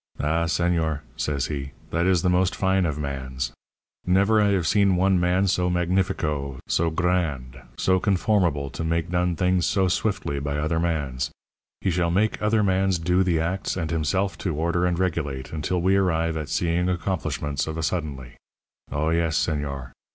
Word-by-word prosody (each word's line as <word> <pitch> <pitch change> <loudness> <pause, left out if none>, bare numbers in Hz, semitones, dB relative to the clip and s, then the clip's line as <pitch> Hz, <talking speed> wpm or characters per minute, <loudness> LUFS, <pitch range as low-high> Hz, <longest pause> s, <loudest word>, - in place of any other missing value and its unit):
"'Ah, 80 +3 +1
señor,' 80 -3 0
says 70 -2 -1
he, 70 -2 -5 0.2
'that 85 +2 +1
is 90 -3 +3
the - - +2
most 90 +1 +2
fine 95 -2 +2
of 75 -2 -3
mans. 65 -3 -4 0.5
Never 100 +4 +3
I 105 - +4
have 95 -4 +1
seen 100 +1 +3
one 95 0 +3
man 90 +2 +2
so 90 -1 +1
magnifico, 85 -6 0
so 85 0 +1
gr 90 +3 -1
r 90 - +3
rand, 65 -6 -6 0.2
so 95 0 +2
conformable 90 -8 +1
to - - -5
make 85 +1 -1
done 90 -1 +1
things 90 0 +2
so 95 -2 +2
swiftly 95 -6 -1
by 70 +1 -2
other 80 +2 0
mans. 70 -7 -1 0.5
He 95 - +1
shall 85 0 +1
make 105 +6 +1
other 105 0 +2
mans 95 -1 +2
do 90 +3 +1
the 90 -4 +2
acts 90 +4 -2
and 80 -3 -2
himself 95 +5 0
to 85 -6 -2
order 85 +3 +1
and 90 -1 0
regulate, 75 -8 -2
until 80 +4 -1
we 95 +3 +3
arrive 85 -4 +1
at 75 -3 -4
seeing 85 +2 +1
accomplishments 80 -5 -2
of 80 0 -4
a 80 - -2
suddenly. 75 -7 -3 0.5
Oh, 75 +4 0
yes, 85 -1 +1
señor. 70 -4 -2
85 Hz, 180 wpm, -24 LUFS, 75-95 Hz, 0.5 s, I